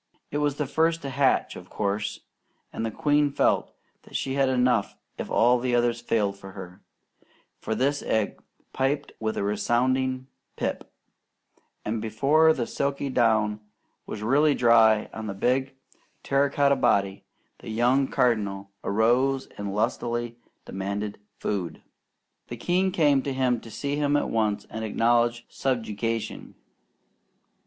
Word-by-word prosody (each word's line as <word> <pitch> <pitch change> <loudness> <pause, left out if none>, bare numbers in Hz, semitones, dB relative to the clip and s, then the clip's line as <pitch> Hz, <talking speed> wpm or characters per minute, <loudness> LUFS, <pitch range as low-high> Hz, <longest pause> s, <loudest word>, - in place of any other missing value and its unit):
It 145 - -1
was 145 -2 +1
the 150 - -2
first 165 +4 +1
to 135 - -4
hatch, 135 0 +1
of - - -11
course, 100 0 -2 0.5
and - - -3
the 115 - -1
queen 145 +4 +2
felt - - +1 0.3
that - - -15
she 135 - -1
had 135 -1 +2
enough 125 -4 +1 0.2
if - - -4
all 120 +2 +4
the 125 0 0
others 120 -1 +1
failed 105 -4 0
her; 95 -1 -10 0.8
for 110 - -3
this 140 +5 +1
egg 110 -2 -1 0.3
pipped 140 +2 -1
with 110 0 -2
a - - 0
resounding 130 +5 0 0.3
pip, - - -4 0.9
and 110 +1 -2
before 140 +9 +3
the 125 -7 -1
silky 140 +1 -2
down 110 -4 +2 0.5
was 105 - -6
really 145 +5 +3
dry 115 -3 +5
on 110 0 -6
the 100 - -4
big 130 +6 0 0.5
terracotta 140 0 +2
body, 100 -1 +1 0.4
the - - -10
young 125 +5 +2
Cardinal 100 -6 0
arose 125 +6 +2
and 100 -1 -4
lustily 120 +2 -1 0.3
demanded 100 +2 -4 0.2
food. 95 -5 -3 0.6
The 120 - -7
king 180 +8 +1
came 145 -6 +3
to 130 -4 -1
see 140 +6 -3
him 145 -1 +1
and 145 - +2
at - - -5
once 110 -2 0
acknowledged 120 +2 +1
subjugation. 115 -3 -3
120 Hz, 135 wpm, -26 LUFS, 110-135 Hz, 0.9 s, dry